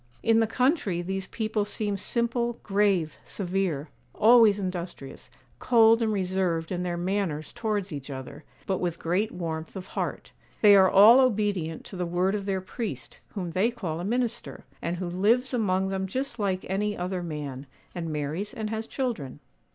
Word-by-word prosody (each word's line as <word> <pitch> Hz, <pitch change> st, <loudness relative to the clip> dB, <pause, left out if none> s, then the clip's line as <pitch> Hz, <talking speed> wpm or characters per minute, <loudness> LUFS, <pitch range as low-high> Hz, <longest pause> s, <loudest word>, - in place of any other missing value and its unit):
'In 225 Hz, 0 st, +4 dB
the 225 Hz, -, +3 dB
country 250 Hz, -, +1 dB
these 190 Hz, +1 st, -3 dB
people 215 Hz, -1 st, -1 dB
seem 205 Hz, 0 st, -1 dB
simple, 235 Hz, +3 st, -1 dB
grave, 195 Hz, -5 st, +1 dB
severe; 180 Hz, -6 st, -2 dB, 0.3 s
always 225 Hz, -2 st, +6 dB
industrious; 180 Hz, -7 st, -5 dB, 0.3 s
cold 230 Hz, -1 st, +5 dB
and 220 Hz, -1 st, +1 dB
reserved 185 Hz, -4 st, -1 dB
in 180 Hz, -1 st, -2 dB
their 175 Hz, -1 st, -2 dB
manners 175 Hz, -4 st, -2 dB
towards 210 Hz, -6 st, -2 dB
each 140 Hz, -1 st, -6 dB
other, 135 Hz, +2 st, -8 dB, 0.2 s
but 190 Hz, -2 st, -1 dB
with 175 Hz, -2 st, -2 dB
great 185 Hz, +7 st, 0 dB
warmth 160 Hz, -2 st, -5 dB
of 185 Hz, -1 st, -6 dB
heart. -, -, -4 dB, 0.3 s
They 205 Hz, -2 st, +8 dB
are 190 Hz, -1 st, +6 dB
all 215 Hz, +6 st, +8 dB
obedient 205 Hz, -10 st, 0 dB
to -, -, -9 dB
the 180 Hz, -1 st, -2 dB
word 180 Hz, +3 st, +1 dB
of 205 Hz, -1 st, -3 dB
their 190 Hz, -1 st, 0 dB
priest, 220 Hz, +4 st, -6 dB, 0.2 s
whom 180 Hz, -4 st, -3 dB
they 190 Hz, +7 st, +2 dB
call 180 Hz, -9 st, -4 dB
a -, -, -4 dB
minister, 235 Hz, +3 st, -2 dB, 0.2 s
and 170 Hz, +1 st, -2 dB
who 185 Hz, -, -3 dB
lives 220 Hz, +9 st, +2 dB
among 190 Hz, -5 st, +1 dB
them 190 Hz, 0 st, -2 dB
just 255 Hz, +3 st, -3 dB
like 190 Hz, -3 st, -1 dB
any 205 Hz, +2 st, -1 dB
other 180 Hz, +1 st, -2 dB
man, 145 Hz, -5 st, -6 dB, 0.3 s
and 170 Hz, -2 st, -4 dB
marries 155 Hz, -, -3 dB
and 220 Hz, -2 st, -4 dB
has 220 Hz, 0 st, -3 dB
children. 230 Hz, -, -3 dB
195 Hz, 170 wpm, -27 LUFS, 175-220 Hz, 0.3 s, They